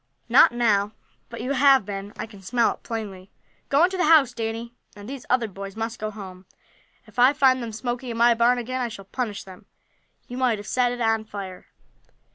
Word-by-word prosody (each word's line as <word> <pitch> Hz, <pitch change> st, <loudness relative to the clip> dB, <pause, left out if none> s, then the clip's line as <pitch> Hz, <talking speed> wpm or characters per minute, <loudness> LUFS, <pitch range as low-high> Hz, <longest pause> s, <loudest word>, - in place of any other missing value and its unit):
"Not -, -, +6 dB
now, 215 Hz, -4 st, +1 dB, 0.4 s
but -, -, -7 dB
you 260 Hz, -, -3 dB
have 275 Hz, -4 st, +5 dB
been. 200 Hz, 0 st, -6 dB
I -, -, -4 dB
can 210 Hz, -3 st, -15 dB
smell 230 Hz, +5 st, +1 dB
it -, -, -20 dB
plainly. 200 Hz, -5 st, -6 dB, 0.4 s
Go 285 Hz, +4 st, +4 dB
into 375 Hz, +2 st, +2 dB
the 360 Hz, -, +2 dB
house, 300 Hz, -6 st, +5 dB
Danny, 230 Hz, 0 st, -4 dB, 0.2 s
and 205 Hz, 0 st, -11 dB
these 270 Hz, -1 st, -8 dB
other 245 Hz, -2 st, +2 dB
boys 195 Hz, 0 st, -8 dB
must 225 Hz, +1 st, -4 dB
go 215 Hz, -, -3 dB
home. 190 Hz, -3 st, -10 dB, 0.6 s
If -, -, -10 dB
I 255 Hz, +3 st, +6 dB
find 265 Hz, -3 st, +3 dB
them 230 Hz, -1 st, -5 dB
smoking 240 Hz, +3 st, -4 dB
in 230 Hz, -, -4 dB
my 235 Hz, +1 st, +5 dB
barn 235 Hz, +2 st, +3 dB
again 255 Hz, +2 st, -3 dB
I 245 Hz, -, 0 dB
shall 215 Hz, -4 st, -10 dB
punish 215 Hz, 0 st, -4 dB
them. 185 Hz, -1 st, -14 dB, 0.6 s
You 245 Hz, -, -7 dB
might 250 Hz, -4 st, +2 dB
have 205 Hz, -, -9 dB
set 245 Hz, +1 st, +1 dB
it 245 Hz, 0 st, -5 dB
on 225 Hz, -1 st, +1 dB
fire." 195 Hz, -4 st, -8 dB
230 Hz, 210 wpm, -24 LUFS, 205-250 Hz, 0.6 s, Not